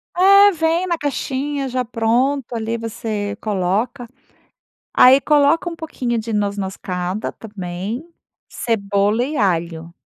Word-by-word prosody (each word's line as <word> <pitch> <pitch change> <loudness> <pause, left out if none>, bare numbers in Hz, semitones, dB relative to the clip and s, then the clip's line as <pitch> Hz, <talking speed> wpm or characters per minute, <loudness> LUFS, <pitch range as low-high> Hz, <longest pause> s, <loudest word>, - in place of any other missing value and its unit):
É, 395 +3 +7
vem 330 +1 0
na 350 -2 0
caixinha 280 -1 -2
já 255 0 -1
pronto, 245 +3 0
ali 225 0 -2
você 215 -2 -4
coloca. 215 +6 -1 0.9
Aí 260 +2 +7
coloca 295 +4 +3
um 335 - -7
pouquinho 255 -8 -3
de 225 +1 -5
noz-moscada 195 -2 -3
também, 200 - -6 0.4
cebola 205 0 0
e 290 +3 -3
alho. 170 -4 -1
230 Hz, 115 wpm, -20 LUFS, 205-285 Hz, 0.9 s, É